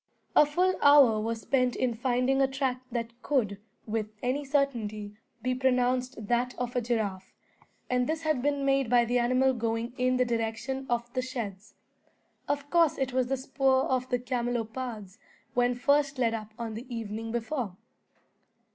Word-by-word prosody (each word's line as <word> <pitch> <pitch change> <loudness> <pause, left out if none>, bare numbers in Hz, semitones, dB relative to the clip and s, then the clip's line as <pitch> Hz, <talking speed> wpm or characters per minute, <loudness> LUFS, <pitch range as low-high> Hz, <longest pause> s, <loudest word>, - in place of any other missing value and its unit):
A 300 - +7
full 360 +5 +2
hour 280 -7 +7
was 225 +1 -2
spent 250 +3 +1
in 250 -2 0
finding 250 +3 +1
a 270 - +4
track 265 -1 -2
that 230 -1 -3
could, 215 -9 0 0.3
with 215 -1 -2 0.2
any 260 +4 0
certainty, 235 -8 -1 0.3
be 255 0 +1
pronounced 250 -2 0
that 245 +2 0
of 250 0 -3
a 245 - +2
giraffe, 215 -5 -2 0.6
and 250 0 +1
this 320 +1 -2
had 310 -5 +1
been 285 0 0
made 275 -3 +2
by 240 -1 +5
the 245 +1 +1
animal 255 +2 +3
going 230 0 -2
in 255 0 +2
the 250 - +3
direction 235 +3 -2
of 240 0 -1
the 255 - 0
sheds. 215 -6 -6 0.7
Of 285 0 -1
course 335 -3 +4
it 265 -1 -1
was 255 -1 +1
the 270 +1 0
spoor 265 0 +2
of 255 0 -1
the 245 - +2
camelopards 240 -3 -3 0.3
when 245 0 +2
first 280 +2 +2
led 235 -3 +2
up 215 -1 -5
on 230 -2 -4
the 245 +4 -8
evening 225 -1 -4
before. 235 -4 -3
250 Hz, 165 wpm, -29 LUFS, 230-265 Hz, 0.7 s, A